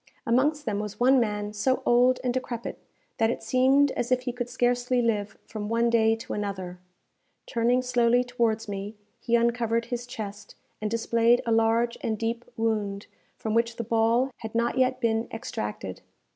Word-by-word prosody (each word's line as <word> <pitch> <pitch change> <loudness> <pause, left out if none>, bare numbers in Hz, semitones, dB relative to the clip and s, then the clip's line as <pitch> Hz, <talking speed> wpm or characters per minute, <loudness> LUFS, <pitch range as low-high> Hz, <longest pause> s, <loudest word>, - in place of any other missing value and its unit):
Amongst 290 +6 +2
them 210 -3 -1
was 210 0 -5
one 260 +2 +5
man 210 -2 -1
so 255 +5 0
old 250 +1 +4
and 250 -1 0
decrepit, 240 -2 -4 0.4
that 225 0 +3
it - - -3
seemed 265 +4 +4
as 245 +1 -3
if 255 0 +3
he 250 0 -3
could 245 0 -4
scarcely 245 0 +1
live 210 -4 -1
from 210 -1 -6
one 230 +1 +2
day 225 -1 +4
to 225 - -7
another. 190 -3 -4 0.7
Turning 240 +2 +1
slowly 245 -1 +3
towards 230 -3 -1
me, 200 +1 -5 0.2
he 235 -1 +1
uncovered 235 -1 +1
his 240 0 -4
chest, 210 -3 -7 0.3
and 215 - -1
displayed 230 +1 +2
a 230 - 0
large 225 +1 +2
and 220 -1 -1
deep 230 +2 -3
wound, 210 -3 -1 0.3
from 220 - -3
which 230 +1 +1
the 235 - -3
ball 230 +3 +2
had 220 0 -8
not 235 +1 +1
yet 255 -1 +2
been 230 -1 0
extracted. 105 - -5
230 Hz, 170 wpm, -26 LUFS, 220-245 Hz, 0.7 s, one